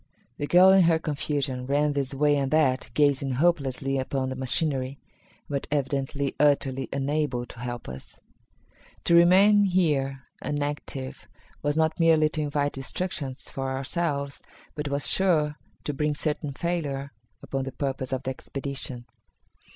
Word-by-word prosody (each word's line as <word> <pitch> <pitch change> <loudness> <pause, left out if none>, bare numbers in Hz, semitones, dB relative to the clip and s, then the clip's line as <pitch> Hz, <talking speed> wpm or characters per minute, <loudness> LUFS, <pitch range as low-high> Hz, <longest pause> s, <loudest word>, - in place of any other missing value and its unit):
The 145 - -2
girl 185 +3 +7
in 190 -2 +6
her 165 -1 +4
confusion 140 -4 -2
ran 145 +1 +2
this 140 -2 0
way 145 +1 +3
and 140 -2 0
that, 135 -6 +2
gazing 140 -2 +2
hopelessly 135 -3 +1
upon 130 0 -2
the 130 - -4
machinery, 130 0 -1 0.5
but 140 -1 -3
evidently 140 -1 -1
utterly 135 -3 +2
unable 140 -2 -1
to 120 - -13
help 120 0 -5
us. 65 +1 -9 0.8
To - - +2
remain 195 +5 +6
here 145 -8 +1 0.2
inactive 145 -2 -4 0.3
was 145 +1 0
not 160 +1 +1
merely 160 -2 +5
to 155 - -3
invite 145 -1 0
destruction 135 0 -3
for 135 0 -5
ourselves, 140 +1 -2 0.3
but 150 0 -4
was 140 0 0
sure 155 -6 +2 0.2
to 150 - -2
bring 150 +1 0
certain 150 -1 -2
failure 140 -4 -2 0.3
upon 135 -1 -3
the 135 - -4
purpose 135 -1 -3
of 130 -1 -2
the 130 - -2
expedition. 135 -2 -5
140 Hz, 145 wpm, -26 LUFS, 135-155 Hz, 0.8 s, girl